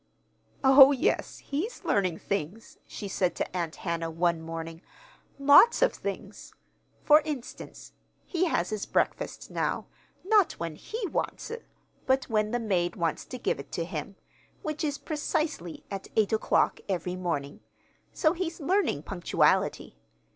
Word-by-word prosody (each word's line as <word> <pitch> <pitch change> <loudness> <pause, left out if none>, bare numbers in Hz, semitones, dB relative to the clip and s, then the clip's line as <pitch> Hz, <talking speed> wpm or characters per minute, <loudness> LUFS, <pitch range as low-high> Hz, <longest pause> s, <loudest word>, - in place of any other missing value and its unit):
"Oh, 270 +1 +9
yes, 270 - 0
he's 350 - -4
learning 185 -5 +1
things," 200 +4 -4
she 205 - -6
said 185 -2 0
to - - -4
Aunt 170 -3 -2
Hannah, 170 -2 -3
one 170 0 0
morning; 165 0 -6 0.6
"lots 285 - +7
of - - +3
things. - - -7 0.5
For 300 +1 +7
instance: 290 -6 -7 0.3
he 360 0 0
has 200 - 0
his 215 -2 -3
breakfast - - -1
now, - - -1 0.4
not 410 -3 +4
when 165 -1 -5
he 435 - -5
wants 365 - -3
it, 465 0 -7 0.4
but 265 0 +2
when 215 -1 +2
the 240 - 0
maid 180 -6 0
wants 165 -2 -1
to 255 - -7
give - - -1
it - - -10
to - - -2
him - - -6 0.5
which 305 0 -3
is 290 -2 -1
precisely 300 - -3
at 195 -1 -5
eight 215 -1 +2
o'clock 220 - +2
every 180 -1 -2
morning. 165 -6 -3 0.5
So 310 -2 +2
he's 345 -2 -4
learning 335 - +1
punctuality. 175 - +1
215 Hz, 145 wpm, -28 LUFS, -, 0.6 s, Oh